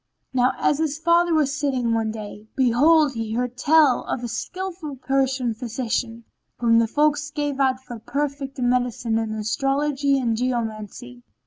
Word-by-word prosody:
Now 255 0 +3
as 290 - +1
his 305 -2 -1
father 340 +1 +3
was 295 -3 +2
sitting 260 -6 0
one 225 -1 0
day, 215 -1 -8
behold 275 +4 +4
he 225 -2 -4
heard 250 0 -2
tell 290 -1 +4
of 245 - -3
a - - -2
skillful 350 +3 -5
Persian 265 -2 0
physician, 230 0 -3 0.3
whom 230 -1 +4
the 230 - +2
folk 295 +4 +2 0.2
gave 290 -2 -2
out 260 -1 +2
for 240 -3 -8
perfect 280 +3 -3
in 245 -2 0
medicine 245 -2 0
and 220 -1 -3
astrology 275 +5 0
and 235 -4 0
geomancy. 220 - -4
255 Hz, 155 wpm, -23 LUFS, 230-290 Hz, 0.3 s, behold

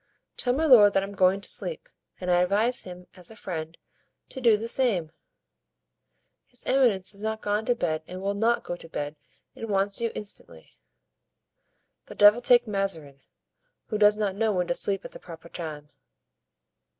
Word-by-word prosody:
"Tell 245 - -1
my 310 +5 0
lord 215 -8 +7
that 195 - +2
I'm 195 - -6
going 190 0 +2
to - - -3
sleep, - - 0 0.3
and 180 -1 -2
I 175 0 +4
advise 210 +7 +1
him, 180 -1 -10
as 180 -2 -12
a 225 - -13
friend, 165 -5 -6 0.5
to 260 - -7
do 230 -4 +5
the 225 +2 -5
same." 215 -11 0 1.4
"His 245 - -12
eminence 230 -9 +2
is 200 - -12
not 220 0 -3
gone 210 +1 -1
to 245 - +1
bed 160 -7 -2
and 185 +1 -8
will 200 +1 -2
not 230 +4 +1
go 175 - -5
to 165 -1 -13
bed, 145 -1 -5 0.4
and 225 - -7
wants 200 +1 0
you 230 -1 -1
instantly." 85 - -8 1.3
"The - - -10
devil 210 +3 +6
take 245 0 +5
Mazarin, 190 - -3 0.7
who 215 - -2
does 210 0 +5
not 205 -3 -1
know 220 +1 +1
when 180 -3 0
to 175 - -1
sleep 195 +2 -2
at - - -8
the - - -11
proper 165 -1 -12
time. 150 -4 -8
200 Hz, 180 wpm, -26 LUFS, 180-225 Hz, 1.4 s, lord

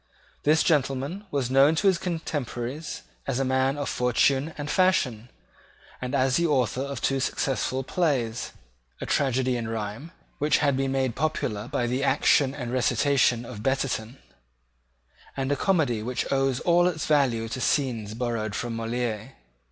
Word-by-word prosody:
This 155 +2 +3
gentleman 145 +6 0
was 135 -5 -1
known 140 +4 +5
to 185 - -1
his 190 -3 +4
contemporaries 150 -4 -4 0.2
as 135 -3 -1
a 135 - 0
man 130 +2 +1
of 145 -2 -3
fortune 130 +5 +2
and 145 -1 -4
fashion, 130 - +1 0.7
and 125 +2 -2
as 130 -1 +2
the 170 0 +2
author 130 -4 +1
of 140 0 -4
two 135 0 +1
successful 130 0 -1
plays, 130 -8 -1 0.5
a - - -4
tragedy 130 -2 +1
in 115 -2 -4
rhyme 110 +7 -5 0.3
which 150 +1 +3
had 140 -3 +2
been 135 0 0
made 130 -3 0
popular 120 -8 -2
by 120 - -1
the 125 +3 -1
action 140 0 +3
and 125 -4 -5
recitation 125 -1 +2
of 105 -2 -8
Betterton, 130 -2 -1 1.2
and 135 0 -1
a - - +3
comedy 140 - +1
which 125 +3 -2
owes 135 -2 +1
all 175 0 +4
its 160 -3 -2
value 130 -7 +2
to 130 - -4
scenes 115 -8 0
borrowed 115 -4 -2
from 120 -1 -3
Moliere. 115 +1 -3
130 Hz, 155 wpm, -26 LUFS, 120-145 Hz, 1.2 s, known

